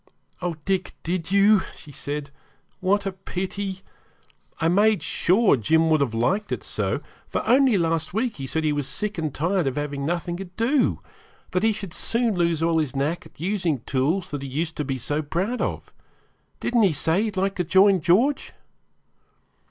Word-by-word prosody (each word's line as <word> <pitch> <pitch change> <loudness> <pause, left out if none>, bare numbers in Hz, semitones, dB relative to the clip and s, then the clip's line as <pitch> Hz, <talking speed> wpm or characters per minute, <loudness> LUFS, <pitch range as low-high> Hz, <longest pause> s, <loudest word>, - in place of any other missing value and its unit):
'Oh, 175 -2 -2
Dick, 190 -2 -1
did 175 +1 -2
you?' 200 +1 +5
she 150 - -13
said. 145 0 -5 0.5
'What 200 +2 +1
a 195 - -1
pity! 190 +1 -4 0.8
I 165 - +2
made 205 0 +3
sure 190 +3 +3
Jim 160 +7 +2
would 155 -2 +4
have 120 -5 0
liked 190 - 0
it - - -2
so, - - -1 0.3
for - - -3
only 260 -3 +5
last 165 -2 0
week 225 +2 -1
he 135 -1 -5
said 160 +5 -1
he 150 -1 +2
was 145 -2 -2
sick 205 +8 -3
and 155 -2 -1
tired 170 +3 0
of 135 - -1
having 145 -1 -3
nothing 175 +2 -2
to 195 - -6
do 230 +10 +1 0.5
that 185 - +1
he 225 +1 +3
should 200 -5 -5
soon 230 +3 0
lose 170 -3 +1
all 165 -1 +2
his 145 -3 -2
knack 150 +5 -1
at - - -26
using 175 - -1
tools 145 +10 -1
that 145 -2 -4
he 140 - -5
used 160 +5 -3
to 150 - -1
be 135 -1 -2
so 145 +5 -2
proud 185 +11 -2
of. - - -3 0.7
Didn't 240 -1 +1
he 195 -6 +4
say 160 +6 +1
he'd 215 -3 -3
like 195 +1 +1
to 180 - +1
join 190 +2 +5
George?' 225 - +2
175 Hz, 185 wpm, -24 LUFS, 150-200 Hz, 0.8 s, you